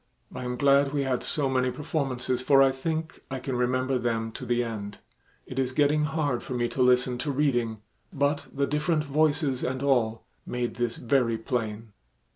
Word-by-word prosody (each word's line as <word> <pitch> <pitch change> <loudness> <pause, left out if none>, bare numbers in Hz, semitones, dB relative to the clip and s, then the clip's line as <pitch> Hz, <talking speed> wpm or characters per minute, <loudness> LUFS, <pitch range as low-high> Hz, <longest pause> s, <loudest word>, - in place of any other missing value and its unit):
I 125 - -5
am 125 0 -2
glad 140 +1 +4
we 140 -1 +1
had 130 -2 0
so 145 -3 0
many 130 -1 +1
performances, 130 -3 -2
for 135 +1 +6
I 135 - +4
think 160 +4 -4
I 135 - -3
can 130 0 -3
remember 130 +1 +1
them 115 -2 -1
to 125 - -8
the 120 +1 +2
end. 105 -3 -5 0.5
It 130 - -5
is 130 -1 0
getting 150 +2 +3
hard 150 -5 -1
for 130 - -5
me 120 -1 +1
to 130 - -2
listen 125 0 +3
to 150 - -2
reading, 120 -6 0 0.3
but 145 +1 0
the 140 0 0
different 150 +2 0
voices 145 -2 +1
and 130 +1 -2
all 115 -5 +1 0.2
made 125 -1 -3
this 120 -1 -1
very 120 -2 +1
plain." 110 -1 -3
130 Hz, 185 wpm, -27 LUFS, 120-140 Hz, 0.5 s, for